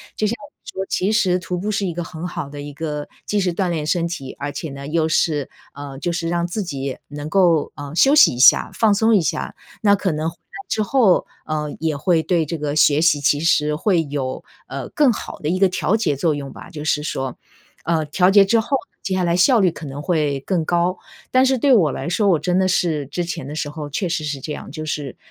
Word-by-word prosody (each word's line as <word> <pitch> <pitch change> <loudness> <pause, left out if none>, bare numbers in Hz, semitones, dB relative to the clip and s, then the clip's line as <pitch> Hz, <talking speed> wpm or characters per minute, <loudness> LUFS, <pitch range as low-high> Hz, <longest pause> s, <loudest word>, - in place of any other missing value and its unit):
就 215 - 0
像 225 - -1 0.3
你 - - -11
说 190 - -1
其 195 +3 0
实 185 -4 +2
徒 180 0 -4
步 205 +4 -2
是 200 -1 -1
一 - - -2
个 175 +1 -4
很 165 +1 -6
好 155 - -5
的 145 0 -7
一 145 0 -7
个 150 0 -4 0.2
既 210 - 0
是 185 -2 +1
锻 185 +2 -1
炼 160 -3 -2
身 170 +1 +1
体， 140 -6 -6
而 145 +1 -4
且 150 +3 -5
呢 140 0 -8
又 160 +2 0
是 150 -3 +1 0.2
呃， 140 -1 -8
就 175 +5 -2
是 165 -1 -2
让 170 0 0
自 175 +5 -3
己 140 -7 -4
能 145 0 -7
够， 170 -3 +3
呃， 145 +1 -8
休 270 +10 +5
息 305 - +7
一 - - -8
下、 130 - +6
放 220 -2 +3
松 220 +2 +3
一 195 - +4
下。 160 -1 -2 0.3
那 205 -2 +5
可 195 -2 -1
能 155 +1 -1
回 165 - -13
来 170 - -13
之 215 - 0
后， 210 -4 +3 0.2
呃， 150 -1 -3
也 160 -2 -1
会 165 +2 +2
对 165 -1 +1
这 160 +2 -4
个 145 0 -2
学 150 0 +4
习 160 -3 +4
其 145 +1 +2
实 150 -1 +2
会 175 +1 +1
有， 140 -3 -4 0.2
呃， - - -5
更 290 -4 +3
好 220 - -6
的 150 - -2
一 180 - +1
个 195 +1 +5
调 190 +2 0
节 175 -10 0
作 155 +2 +1
用 140 -1 -6
吧， - - -11
就 150 -2 -7
是 150 -1 +1
说。 135 -4 -4 0.5
呃， 160 -1 0
调 180 +5 +2
节 200 0 +6
之 230 +4 +3
后， 270 +5 0 0.2
接 190 - -2
下 185 - 0
来 170 -1 +1
效 235 +7 +5
率 185 -4 +3
可 160 -1 -9
能 140 +2 -7
会 150 -6 0
更 175 +3 -1
高。 175 +2 0 0.3
但 255 0 +5
是 265 0 +3
对 270 +2 +4
我 165 -10 +3
来 135 - -5
说， 200 +4 +1
我 175 - +4
真 180 +4 0
的 190 - +2
是 160 -6 0
之 175 +6 -3
前 165 -5 -5
的 150 - -6
时 150 -2 -3
候 150 -1 -6
确 180 +6 -2
实 165 -2 -2
是 150 -2 -3
这 150 +3 -5
样， - - -8
就 155 +1 -6
是， 145 -4 -4
165 Hz, 270 characters per minute, -21 LUFS, 150-185 Hz, 0.5 s, 息